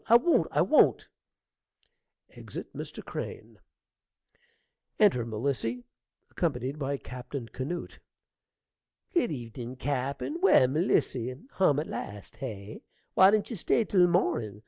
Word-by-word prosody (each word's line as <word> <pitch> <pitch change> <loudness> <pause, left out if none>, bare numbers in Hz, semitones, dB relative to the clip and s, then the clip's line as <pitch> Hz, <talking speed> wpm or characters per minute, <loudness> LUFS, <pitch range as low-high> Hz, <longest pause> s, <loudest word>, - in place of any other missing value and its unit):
I 230 - +7
won't. 330 +9 +4
I - - +2
won't. - - +4 1.2
(Exit - - -9
Mr. - - -7
Crane.) - - -7 1.4
(Enter 200 - +4
Melissy, 120 +1 -2 0.5
accompanied 140 -3 -2
by 140 0 -1
Captain 125 -1 -7
Canoot.) 150 +9 -5 1.1
Good 335 -10 +2
evenin', 120 -2 -6
cappen! 140 - -3
Well, 380 - +6
Melissy, 130 -5 +1 0.2
hum 150 -7 +3
at 150 - -2
last, 105 +1 -7
hey? 105 -5 -7 0.3
Why 190 +1 +7
didn't 215 +3 +1
you - - -3
stay 215 +4 +1
till 180 -4 +4
mornin'? 115 - 0
135 Hz, 115 wpm, -29 LUFS, 120-180 Hz, 1.4 s, I